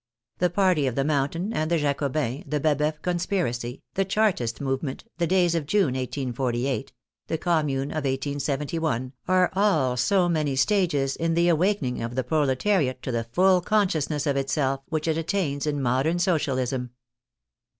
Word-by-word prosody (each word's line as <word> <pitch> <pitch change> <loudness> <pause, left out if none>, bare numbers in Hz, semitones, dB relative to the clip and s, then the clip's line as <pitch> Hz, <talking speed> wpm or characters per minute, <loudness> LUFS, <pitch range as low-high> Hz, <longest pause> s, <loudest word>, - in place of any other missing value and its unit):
The 180 - +3
party 175 -6 +2
of 125 - -2
the 135 - +1
Mountain 155 +8 -1
and 155 -4 -1
the 170 - +2
Jacobins, 140 -2 -1
the 150 +1 -1
Baboeuf 150 +1 +1
conspiracy, 170 -9 -2
the 195 - +1
Chartist 190 - 0
movement, 135 0 -3 0.2
the 170 - +1
days 180 -1 +3
of 160 -4 -2
June, 190 -7 +2
1848, 130 0 -2 0.4
the 160 - -1
Commune 150 -5 0
of 155 - -3
1 - - 0
87 140 +3 -2
1, 130 -4 -1
are 185 -1 +3
all 185 -11 +2
so 175 +9 +2
many 155 -5 0
stages 145 -3 +1
in 165 0 0
the 170 +1 +3
awakening 170 -6 +1
of 115 +1 -4
the 130 - 0
proletariat 140 - +1
to 130 - -3
the 115 -1 -1
full 180 +9 +3
consciousness 165 -7 0
of 140 -2 +1
itself 135 0 0
which 155 -1 -2
it 160 0 +1
attains 160 -5 -1
in 145 -1 0
modern 135 +6 +1
Socialism. 130 -8 0
150 Hz, 160 wpm, -25 LUFS, 135-175 Hz, 0.4 s, The